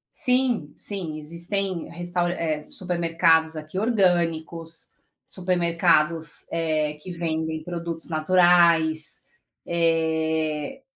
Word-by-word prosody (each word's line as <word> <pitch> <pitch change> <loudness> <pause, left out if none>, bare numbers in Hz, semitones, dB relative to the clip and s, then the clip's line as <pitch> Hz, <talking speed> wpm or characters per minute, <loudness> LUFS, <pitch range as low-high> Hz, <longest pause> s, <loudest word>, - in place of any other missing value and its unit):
Sim 250 - +2
sim, 175 -7 -3
existem 170 +3 -2
restaura 175 +1 -1
eh, 155 -2 -2
supermercados 165 -1 +1
aqui 155 +4 -7
orgânicos, 170 -6 0 0.4
supermercados, 170 -3 +1
eh, 155 -2 0
que 185 - -8
vendem 160 -2 -3
produtos 170 -1 -5
naturais, 165 -1 +3 0.4
eh 160 - 0
165 Hz, 80 wpm, -24 LUFS, 160-175 Hz, 0.4 s, naturais